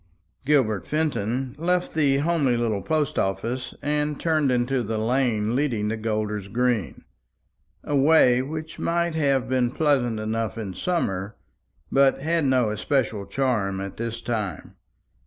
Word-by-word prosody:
Gilbert 110 - +2
Fenton 135 -5 -1
left 180 +2 0
the 140 -3 +3
homely 145 -5 +1
little 110 -4 0
post 155 +2 0
office 120 +6 -2
and 150 0 -1
turned 155 -4 +1
into 125 +1 +1
the 110 -1 -3
lane 115 -1 +1
leading 120 -7 0
to 110 - -1
Golder's 105 -2 -2
green 120 -2 -1 0.8
a 145 - -2
way 135 -3 +5
which 155 +4 -6
may 170 0 0
have 140 -5 +1
been 125 -2 +1
pleasant 125 -5 +1
enough 110 -1 -2
in 105 -4 -5
summer, 100 - -2 0.6
but 135 0 +4
had 165 +1 0
no 130 -5 +2
especial 110 -2 -1
charm 110 -8 0
at 100 0 -6
this 115 0 -4
time. 105 -8 -4
125 Hz, 140 wpm, -24 LUFS, 110-145 Hz, 0.8 s, way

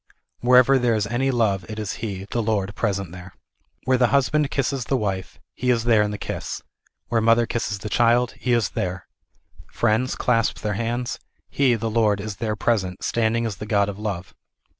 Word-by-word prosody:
"Wher 125 +1 +5
ever 130 +2 +6
there 120 -2 +2
is 105 -2 0
any 120 +6 0
love 110 -7 +1
it 110 - -6
is 105 -2 -4
He, 100 -4 -4
the 120 - 0
Lord 105 -3 -1
present 100 -6 -2
there." 90 +1 -11 0.5
W^here 130 -1 +3
the 125 - +5
husband 140 +3 +2
kisses 135 -2 -1
the 135 - +1
wife, 95 -5 -3
He 125 - -2
is 120 -2 +2
there 115 -2 +4
in 105 - +1
the 105 - -4
kiss; - - -5 0.5
where 115 -1 +2
the - - -1
mother 115 +1 +5
kisses 115 -3 -2
the 105 - -7
child, 120 +2 +3
He 125 - -1
is 115 -2 +2
there; 90 0 -3 0.7
friends 120 +3 +1
clasp 115 -3 +1
their 105 -1 -1
hands, 120 +4 -2 0.3
He, 130 -4 +3
the 115 0 -3
Lord, 105 -3 +2
is 100 -1 -5
there 110 -2 -2
present, 100 -5 -1
standing 115 0 +1
as 105 -5 -3
the 105 - -7
God 100 -2 +2
of 100 0 -7
Love. 95 -5 -4
115 Hz, 205 wpm, -23 LUFS, 100-120 Hz, 0.7 s, ever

